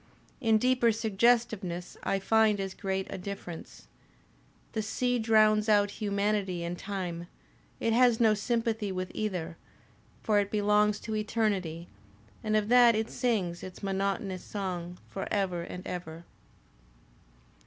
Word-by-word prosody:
In 225 -4 +3
deeper 250 0 +3
suggestiveness 220 -4 +1
I 195 - 0
find 215 +1 +3
as 195 -1 -3
"great 190 -1 -2
a - - -5
difference. 180 -3 -8 0.9
The 220 - -1
sea 245 +3 0
drowns 215 -1 +4
out 205 -1 +4
humanity 200 -3 0
and 170 +1 -3
time; 175 -3 -5 0.5
it 230 - +1
has 245 -1 +4
no 220 -2 +5
sympathy 225 -1 -1
with 185 -1 -4
either; 180 -6 -3 0.7
for 210 -2 +3
it 200 -1 0
belongs 210 0 +2
to 220 -1 -4
eternity, 205 -6 -1 0.6
and 215 -1 0
of 210 -1 +2
that 240 -2 +7
it 220 +1 -1
sings 200 -9 -1
its 185 +1 -9
monotonous 195 -1 -2
song 180 -3 -4
for 195 - -5
ever 190 -4 0
and 180 +2 -7
ever. 170 -2 -6
205 Hz, 130 wpm, -29 LUFS, 185-220 Hz, 0.9 s, that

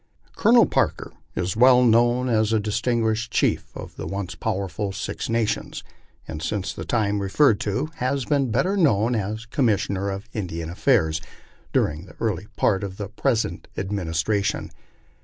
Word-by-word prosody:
Colonel - - +6
Parker - - -1 0.2
is 90 +1 -1
well 125 +2 +6
known 120 +2 +3
as 110 -2 +2
a 110 - +3
distinguished 110 +1 0
chief - - +1
of - - -9
the - - -5
once 95 -3 -4
powerful 95 +3 -3
Six 95 - -4
Nations, 115 -2 -1 0.4
and 80 -1 -6
since 95 +3 -2
the - - -7
time 105 -3 0
referred 100 +3 +3
to 105 +10 -2
has 130 +1 -1
been 140 -4 +1
better 135 - +1
known 120 - +3
as 110 +1 -3
Commis 115 -4 +1
sioner 100 0 -2
of 100 +3 -6
Indian 85 -5 -4
Affairs 90 - +2 0.5
during 75 +5 0
the - - -15
early 105 -3 -2
part 95 0 +1
of 95 -1 -5
the 100 -2 -5
present 115 +1 -1
administration. 95 +1 -1
105 Hz, 155 wpm, -24 LUFS, 95-120 Hz, 0.5 s, Colonel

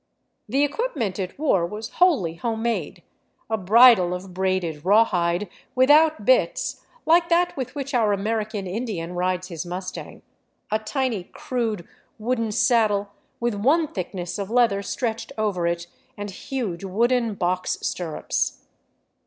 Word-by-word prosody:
The 275 +5 +2
equipment 285 - -2
it 185 -1 -4
wore 275 - +2
was 210 +6 -5
wholly 280 - +4
home 220 +6 -3
made, 235 -1 -2 0.2
— - - -42
a - - +3
bridle 210 -2 +6
of 180 0 -8
braided 185 -5 -1
rawhide, 185 -2 +3 0.3
without 300 +5 +5
bits, - - +2 0.2
like 335 +1 +4
that 350 +1 +2
with 255 -1 -5
which 280 0 -4
our 225 -4 +3
American 210 0 -2
Indian 185 -4 -4
rides 185 +1 -1
his 165 -3 -5
mustang, 185 +1 -7 0.5
a 215 - +2
tiny, 230 -4 -2
crude, 225 -8 -3 0.3
wooden 230 0 -1
saddle 215 -3 +2 0.3
with 240 -1 0
one 285 +11 +2
thickness 180 0 -5
of 200 0 -4
leather 230 -4 +3
stretched 225 +2 -3
over 200 -6 0
it, 170 0 -2 0.3
and 205 -1 -5
huge 200 -4 -4
wooden 230 +3 +1
box 180 0 -1
stirrups. 165 -4 -2
210 Hz, 135 wpm, -24 LUFS, 185-245 Hz, 0.5 s, bridle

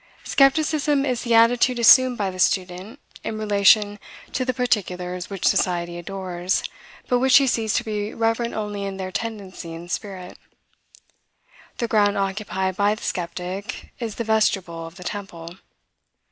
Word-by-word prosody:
Skepticism 290 0 +2
is 250 -3 -1
the 235 -1 +1
attitude 240 +2 +4
assumed 250 +1 +6
by 195 -2 -1
the 185 - -10
student 185 +7 -1 0.2
in 220 - -4
relation 205 0 +3 0.3
to 255 - 0
the 255 - 0
particulars 180 -7 -2
which 195 -3 -5
society 175 -1 0
adores, 185 0 -2 0.4
but 245 - +2
which 265 +2 +6
he 275 - +4
sees 225 -4 0
to - - +1
be 210 -2 -3
reverent 225 +1 -1
only 210 -2 -4
in 195 -1 -4
their 185 -1 -5
tendency 190 -6 -6
and 170 +1 -9
spirit. 185 -3 -6 1.4
The 235 - -1
ground 205 -2 +2
occupied 190 -1 -2
by 205 +1 +2
the 215 - -12
skeptic 180 +4 -5
is 230 -4 -4
the 235 - -3
vestibule 195 -7 0
of 165 - -13
the 180 - -10
temple. 175 -3 -7
205 Hz, 150 wpm, -23 LUFS, 185-230 Hz, 1.4 s, assumed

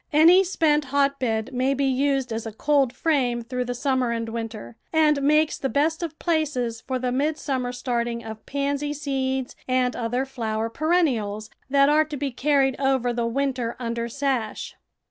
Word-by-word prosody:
Any 335 +5 +7
spent 305 -5 +1
hotbed 265 -4 0
may 260 +2 +1
be 275 +1 0
used 270 -2 +1
as 225 0 -4
a - - -5
coldframe 260 -1 +1
through 250 0 -2
the 245 0 -3
summer 260 -1 0
and 230 -1 -2
winter, 225 - -6 0.2
and 305 -3 +3
makes 305 +2 +3
the 270 - -1
best 315 +5 +1
of 320 -2 -4
places 280 -9 -1
for 260 -1 -3
the 250 0 -2
midsummer 270 -2 -1
starting 240 -1 -2
of 220 0 -8
pansy 285 +1 -1
seeds 265 -3 -2
and 255 -1 +1
other 245 +3 -1
flower 225 -4 -3
perennials 235 - 0 0.2
that 275 0 +5
are 305 +1 +4
to 300 -2 -6
be 275 0 -2
carried 270 0 +2
over 260 -3 +1
the 235 -1 -1
winter 255 -1 -1
under 235 -1 -3
sash. 260 -4 -2
265 Hz, 165 wpm, -24 LUFS, 235-285 Hz, 0.2 s, Any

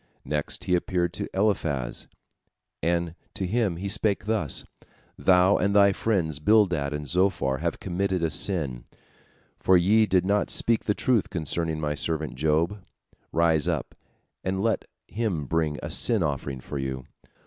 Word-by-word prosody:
Next 75 +1 -2
he 90 - -1
appeared 90 -1 0
unto - - -4
Eliphaz, 95 - 0 0.7
and 85 +1 0 0.2
to 95 - -1
him 105 -2 0
He 100 +3 -4
spake 105 0 +1
thus: 105 - -1 0.5
"Thou 90 +1 +4
and 100 0 0
thy 100 -1 +6
friends 90 -8 -1
Bildad 90 -6 +3
and 75 0 -4
Zophar 90 -6 +1
have 85 +1 -2
committed 95 -1 -1
a 80 - +1
sin, 70 -11 +1 0.7
for 95 - +5
ye 105 +5 +4
did 95 -2 +2
not 100 +1 +1
speak 115 -2 +2
the 105 - +1
truth 120 -5 +1
concerning 80 0 -2
my 75 -1 -1
servant 80 +1 -1
Job. 80 +7 0 0.5
Rise 80 -2 +2
up - - -2 0.5
and 95 +1 -1
let 115 -1 0 0.2
him 100 -10 -2
bring 80 0 0
a - - -4
sin 110 -6 +2
offering 70 -3 -3
for 70 - -6
you. 65 -1 -4
85 Hz, 150 wpm, -26 LUFS, 75-100 Hz, 0.7 s, thy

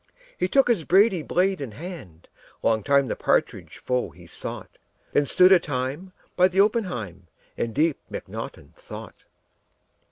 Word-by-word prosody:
He 180 - 0
took 275 +7 +3
his 225 -9 +2
brady 190 +1 +4
blade 185 +2 0
in 125 -6 -6
hand; 135 - -10 0.4
Long 110 -1 +2
time 140 +4 +3
the - - -2
partridge - - -1
foe 125 -1 -1
he - - -16
sought. - - -8 0.3
Then 145 -1 +2
stood 185 +6 +5
a 190 - +8
time 145 +5 -4 0.2
by 180 0 +5
the 190 +1 -1
oppenheim 120 - 0 0.3
In 115 - -2
deep 155 +5 +1
mcnaughton - - -8
thought. - - -11
160 Hz, 150 wpm, -24 LUFS, 125-185 Hz, 0.4 s, a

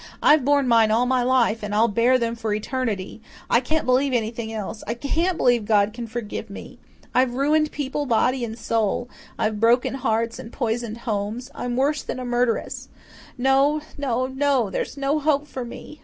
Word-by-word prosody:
"I've 300 -2 +6
borne 285 0 +3
mine 230 -2 +5
all 230 +3 +3
my 255 0 +2
life 245 -3 +2
and 210 0 -3
I'll 225 +2 +4
bear 235 +4 +3
them 230 -1 -1
for 225 -1 -4
all 210 - +1
eternity. 215 -3 -3 0.3
I 235 - +6
can't 310 +5 -1
believe 260 +2 +2
anything 225 -1 -2
else. 215 0 -5
I 230 - -2
CAN'T 330 +8 -1
believe 245 -3 +3
God 205 -1 +3
can 235 0 -6
forgive 225 -1 -5
me. 200 - -10 0.3
I've 250 -1 +2
ruined 300 +3 +2
people 290 0 -3
body 250 +2 +2
and 225 -1 -5
soul 230 +1 -1 0.3
I've 215 -1 -1
broken 235 +4 +3
hearts 230 -2 -1
and 225 - -9
poisoned 235 -2 -3
homes 215 +2 -3
I'm 245 -1 -3
worse 280 +3 +1
than - - -5
a 255 - -5
murderess. 245 -1 -1 0.5
No 270 +4 +3
no 255 -3 -1
no, 265 -5 +1
there's - - -3
no 280 +2 0
hope 295 -1 +1
for 260 -3 -5
me." 300 +5 -10
245 Hz, 185 wpm, -23 LUFS, 225-270 Hz, 0.5 s, I've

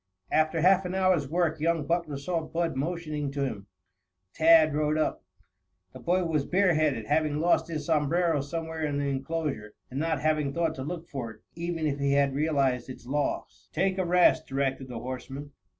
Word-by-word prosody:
After 155 +1 +2
half 190 +2 +5
an 180 +1 -3
hour's 185 -7 +2
work 165 -1 0
young 165 -1 +1
Butler 165 -3 -1
saw 165 +4 -2
Bud 165 -1 -2
motioning 155 0 -2
to 140 -1 0
him. 100 -6 -5 0.7
Tad 160 -1 +6
rode 150 +1 +1
up. 155 - -1 0.7
The - - -10
boy 180 +2 +1
was 155 -4 0
bare 185 +3 +3
headed, 150 -8 +1
having 150 +3 +1
lost 165 0 +2
his 155 -3 -4
sombrero 160 0 +2
somewhere 160 +2 -4
in 145 -2 -1
the 145 - -1
enclosure, 135 -5 -3 0.2
and 135 - -3
not 160 -1 0
having 150 -3 +1
thought 165 -1 0
to 130 - -6
look 170 +3 -5
for 125 -5 -5
it, 110 -1 -13
even 170 -1 -3
if 145 -2 -1
he 140 0 +1
had 140 -1 +3
realized 135 -4 +1
its 130 - -9
loss. 145 +3 -3
"Take 190 0 +1
a - - +2
rest," 175 -2 +4
directed 135 -1 -1
the 125 -2 -6
horseman. 130 +4 -6
155 Hz, 185 wpm, -28 LUFS, 140-165 Hz, 0.7 s, Tad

